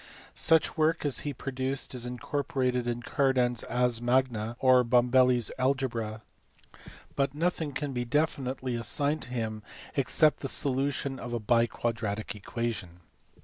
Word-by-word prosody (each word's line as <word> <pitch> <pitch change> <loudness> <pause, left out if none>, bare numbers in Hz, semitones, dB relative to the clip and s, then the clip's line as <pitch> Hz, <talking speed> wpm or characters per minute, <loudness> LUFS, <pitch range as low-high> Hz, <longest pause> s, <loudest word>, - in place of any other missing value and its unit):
Such 160 -1 +3
work 155 0 +2
as 145 - +1
he 145 - -3
produced 135 0 -3
is 125 -1 -2
incorporated 125 -1 -1
in 120 0 -2
Cardan 130 -2 +2
s 120 - -4
Ars 125 -2 +1
Magna 120 -2 +1
or 130 -1 +5
Bombelli 125 +1 +4
s 120 - -1
Algebra, 120 -5 -1 0.9
but 140 0 0
nothing 165 -1 -1
can 140 +1 -4
be 125 -1 -1
definitely 130 -1 -1
assigned 140 +6 0
to - - -5
him 110 -3 -3 0.3
except 150 +2 +3
the 135 - -3
solution 135 0 0
of 120 0 -6
a 120 - -1
biquad 115 +1 +1
ratic 105 -1 -3
equation. 105 -4 -4
125 Hz, 145 wpm, -29 LUFS, 120-135 Hz, 0.9 s, or